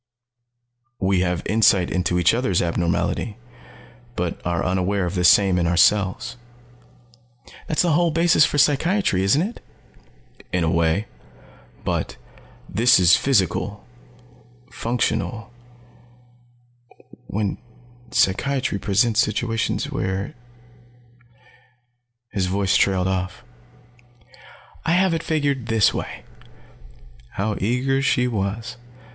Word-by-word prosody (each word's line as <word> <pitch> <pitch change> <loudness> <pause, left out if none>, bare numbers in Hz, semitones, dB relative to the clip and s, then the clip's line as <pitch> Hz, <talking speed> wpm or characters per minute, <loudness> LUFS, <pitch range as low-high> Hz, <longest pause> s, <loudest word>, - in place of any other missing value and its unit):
"We 95 -1 +1
have 90 -1 -1
insight 105 -4 +3
into 90 -1 0
each 90 - +3
other's 115 -7 0
abnormality, 85 +5 -1 0.8
but 85 -1 -3
are 85 -1 -1
unaware 95 +1 0
of 85 - -4
the 90 -2 -1
same 90 +1 +5
in 85 - +1
ourselves." 95 +6 +2 1.3
"That's 155 - +1
the 175 - +1
whole 170 +3 +3
basis 165 0 +3
for 150 - +1
psychiatry, 150 - +2
isn't 120 - +3
it?" 220 +5 -7 0.9
"In 90 -1 0
a 80 - +1
way. 85 +5 +1 0.8
But - - -2 0.5
this 120 +3 +4
is 85 -2 +6
physical 100 - 0 0.9
functional 115 -1 -2 1.7
when 100 -1 -2 0.5
psychiatry 125 +3 0
presents 105 +3 +1
situation 115 +1 0
where 95 +1 -3 1.1
" 120 -1 -33
His 95 -3 0
voice 95 +1 0
trailed 95 -2 +2
off. 95 0 -3 1.4
"I 165 - +1
have 185 0 +3
it 165 - -1
figured 145 -7 -1
this 110 -2 +3
way." - - -6 1.1
How 105 +2 -2
eager 125 +6 0
she 125 -2 +1
was. 110 +2 -3
105 Hz, 105 wpm, -22 LUFS, 95-125 Hz, 1.7 s, is